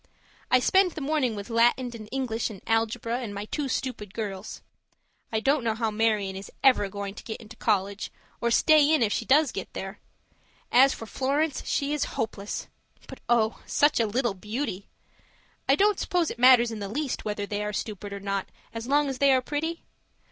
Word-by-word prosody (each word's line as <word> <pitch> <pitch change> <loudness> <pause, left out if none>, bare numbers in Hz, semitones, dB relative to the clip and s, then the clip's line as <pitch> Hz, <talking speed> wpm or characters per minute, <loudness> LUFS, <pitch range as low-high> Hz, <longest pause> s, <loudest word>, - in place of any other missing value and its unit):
I 255 - +5
spend 375 +6 +3
the - - -6
morning 275 -5 0
with 205 +3 -7
Latin 240 +2 +3
and 215 -2 -9
English 245 -4 -1
and 205 -3 -9
algebra 230 +1 0
and 220 -5 -5
my 200 +1 -4
two 285 +6 -3
stupid 220 -6 -4
girls. 200 -3 -5 0.7
I 220 - +1
don't 270 +3 +2
know 225 -2 0
how 225 -1 -1
Marion 210 -3 +1
is 195 +1 -8
ever 255 -7 +5
going 200 0 -5
to - - -11
get 220 - -6
into 225 -1 -12
college, 200 -2 -1 0.3
or 235 - +2
stay 300 +4 +5
in 310 -6 +4
after 210 - +1
she 230 - -2
gets 285 +1 +4 0.2
there. 195 +2 -6 0.7
And 245 - +7
as 270 0 +5
for 225 - -8
Florence, 280 +5 -1
she 285 +1 0
is 300 -1 0
hopeless 210 -2 -3 0.4
but - - -10
oh! 225 -2 +2
such 290 -2 +3
a 225 - +2
little 235 +1 0
beauty. 210 0 -4 0.8
I 275 - +7
don't 410 +3 +3
suppose 350 -3 0
it 235 - -9
matters 245 -2 +6
in 220 - -5
the 200 -1 -5
least 275 +4 -3
whether 210 -1 -3
they 205 0 -3
are 210 - -2
stupid 205 -1 -5
or 200 - -5
not 195 -1 -3 0.3
so 230 +2 -5
long 290 +1 +3
as 265 -2 -4
they 280 -1 +5
are 260 - +5
pretty? 305 +6 -3
230 Hz, 200 wpm, -27 LUFS, 210-270 Hz, 0.8 s, And